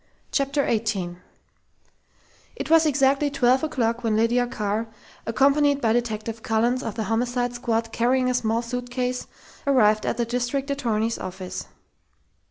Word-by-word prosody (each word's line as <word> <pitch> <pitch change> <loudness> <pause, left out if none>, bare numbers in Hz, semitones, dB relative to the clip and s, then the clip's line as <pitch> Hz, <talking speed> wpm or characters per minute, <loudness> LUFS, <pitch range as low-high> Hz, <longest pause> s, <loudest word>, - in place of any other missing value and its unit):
CHAPTER 280 0 +1
EIGHTEEN 200 -6 -1 1.4
It - - -5
was 325 -1 +6
exactly 280 0 +3
twelve 260 -1 +2
o'clock 240 -6 -1
when 225 -2 +1
Lydia 235 +3 +2
Carr, 220 -2 -2 0.4
accompanied 280 +5 +3
by 225 -4 +2
Detective 225 -1 -2
Collins 235 +3 +1
of 225 -5 -5
the 220 - -2
Homicide 245 +2 -1
Squad 230 -2 -1
carrying 255 +3 +2
a 250 - +1
small 230 -1 0
suitcase, 250 +1 -3 0.4
arrived 215 -6 +4
at - - -1
the 240 - +1
district 250 +4 -2
attorney's 230 -5 -1
office. 185 0 -6
240 Hz, 135 wpm, -24 LUFS, 225-260 Hz, 1.4 s, was